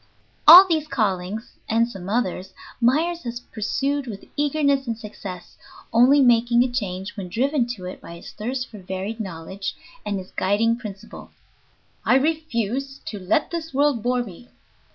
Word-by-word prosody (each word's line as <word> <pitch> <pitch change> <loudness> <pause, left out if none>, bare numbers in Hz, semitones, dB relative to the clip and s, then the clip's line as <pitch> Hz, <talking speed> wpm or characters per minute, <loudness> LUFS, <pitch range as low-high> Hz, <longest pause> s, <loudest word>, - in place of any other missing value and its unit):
All 370 +3 +12
these 315 -3 0
callings 205 - -2
(and 230 +1 +3
some 195 -5 -8
others) 190 -4 -2 0.3
Myers 325 +8 +2
has 240 -1 -5
pursued 270 +5 -2
with 205 -4 -7
eagerness 285 -2 +1
and 230 -1 -2
success, 200 -5 -9 0.4
only 255 +5 +6
making 240 -1 +4
a 250 - -2
change 195 -4 -4
when 190 -4 -6
driven 255 - +1
to 185 -4 -10
it 180 - -7
by 170 - -10
his 170 - -11
thirst 250 +4 -4
for 215 - -11
varied 190 +4 -5
knowledge 190 0 -5 0.3
and 205 - -2
his 185 -1 -8
guiding 215 +4 +1
principle, 215 -3 -9 0.7
"I - - +4
refuse 275 -3 -1
to 210 - -6
let 190 - 0
this 325 -4 -5
world 285 -4 +2
bore 245 +2 +1
me." 230 +3 -12
230 Hz, 155 wpm, -23 LUFS, 195-270 Hz, 0.7 s, All